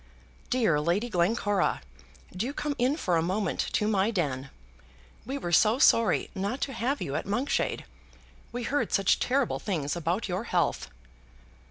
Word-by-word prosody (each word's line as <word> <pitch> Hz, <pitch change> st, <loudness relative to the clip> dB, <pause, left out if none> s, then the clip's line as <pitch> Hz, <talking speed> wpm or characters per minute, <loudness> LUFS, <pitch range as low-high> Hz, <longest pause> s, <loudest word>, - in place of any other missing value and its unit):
"Dear 220 Hz, -12 st, +2 dB
Lady 175 Hz, +10 st, 0 dB
Glencora, 195 Hz, -, +1 dB, 0.5 s
do 235 Hz, +9 st, -2 dB
come 295 Hz, 0 st, -2 dB
in 260 Hz, +5 st, +2 dB
for 180 Hz, -, +1 dB
a -, -, +2 dB
moment 185 Hz, +2 st, -1 dB
to 210 Hz, -, +1 dB
my 205 Hz, -1 st, +2 dB
den. 140 Hz, -, -2 dB, 0.8 s
We 270 Hz, +2 st, -3 dB
were 175 Hz, -10 st, -4 dB
so 215 Hz, +7 st, +4 dB
sorry 230 Hz, -5 st, +4 dB
not 200 Hz, +7 st, -3 dB
to 270 Hz, -, -2 dB
have 255 Hz, +5 st, -1 dB
you 140 Hz, -, -4 dB
at -, -, -3 dB
Monkshade. 245 Hz, +8 st, -1 dB, 0.7 s
We 245 Hz, +1 st, -4 dB
heard 240 Hz, -2 st, -1 dB
such 195 Hz, -1 st, +3 dB
terrible 265 Hz, 0 st, 0 dB
things 155 Hz, -8 st, -2 dB
about 175 Hz, +6 st, -1 dB
your 185 Hz, +4 st, -3 dB
health." 175 Hz, -, 0 dB
205 Hz, 155 wpm, -28 LUFS, 175-245 Hz, 0.8 s, so